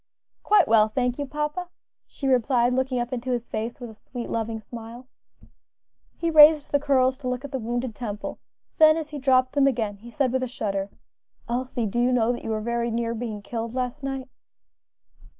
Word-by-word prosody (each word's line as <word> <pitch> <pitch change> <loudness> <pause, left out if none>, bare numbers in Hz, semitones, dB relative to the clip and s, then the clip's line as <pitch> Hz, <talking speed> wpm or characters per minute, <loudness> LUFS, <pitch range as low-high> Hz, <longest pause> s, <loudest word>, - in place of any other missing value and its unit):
"Quite 415 -3 +4
well, 220 -1 +5
thank 250 +3 -1
you, 285 - -2
papa," 300 +5 -3 0.4
she 275 - -5
replied, 250 -1 +3
looking 260 0 0
up 240 +1 -2
into 250 +1 -4
his 240 -2 -1
face 225 +5 -4
with 240 -3 -7
a - - -13
sweet, 240 +2 -8
loving 225 0 -2
smile. 230 +2 -10 1.1
He 335 -1 -1
raised 300 -1 +7
the 285 - +3
curls 260 -2 +2
to 265 - -5
look 250 +2 -3
at 285 - -8
the 265 - -2
wounded 240 +1 -3
temple; 210 -2 -6 0.4
then, 310 0 +7
as 310 -2 -5
he 295 - -5
dropped 255 -1 +3
them 280 -1 +4
again, 225 -6 -1
he 230 +4 -12
said, 265 0 0
with 260 0 0
a 255 - -1
shudder, 200 -5 -3 0.6
"Elsie, 245 0 -2
do 215 +3 -2
you 245 +1 +3
know 240 -2 +3
that 245 - -5
you - - -5
were 215 -1 -1
very 235 +1 -1
near 230 0 -1
being 220 -3 -5
killed 230 +2 -5
last 255 +2 -3
night?" 270 -1 -4
250 Hz, 200 wpm, -25 LUFS, 230-270 Hz, 1.1 s, raised